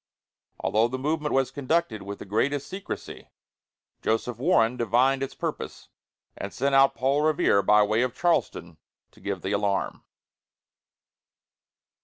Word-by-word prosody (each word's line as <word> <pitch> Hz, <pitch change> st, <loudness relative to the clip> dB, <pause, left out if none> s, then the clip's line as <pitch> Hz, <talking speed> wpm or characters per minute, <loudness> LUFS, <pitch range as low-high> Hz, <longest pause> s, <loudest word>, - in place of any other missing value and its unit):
Although 110 Hz, +2 st, +2 dB
the 130 Hz, +2 st, -4 dB
movement 150 Hz, +2 st, -1 dB
was 135 Hz, -1 st, +1 dB
conducted 145 Hz, -4 st, -1 dB
with 100 Hz, +1 st, -7 dB
the -, -, -9 dB
greatest 135 Hz, +8 st, 0 dB
secrecy, 190 Hz, +1 st, -7 dB, 0.7 s
Joseph 115 Hz, +1 st, -1 dB
Warren 125 Hz, -6 st, +3 dB
divined 125 Hz, +3 st, +2 dB
its 135 Hz, -, -4 dB
purpose, -, -, -5 dB, 0.5 s
and -, -, -6 dB
sent 140 Hz, +2 st, -1 dB
out 135 Hz, 0 st, +5 dB
Paul 135 Hz, +5 st, +1 dB
Revere 155 Hz, -, +3 dB
by 105 Hz, +2 st, +5 dB
way 110 Hz, +3 st, +1 dB
of 125 Hz, 0 st, -1 dB
Charlestown 125 Hz, -, -1 dB, 0.3 s
to -, -, -21 dB
give 100 Hz, -3 st, -4 dB
the 95 Hz, -, -2 dB
alarm. 100 Hz, -1 st, -1 dB
125 Hz, 135 wpm, -26 LUFS, 105-140 Hz, 0.7 s, out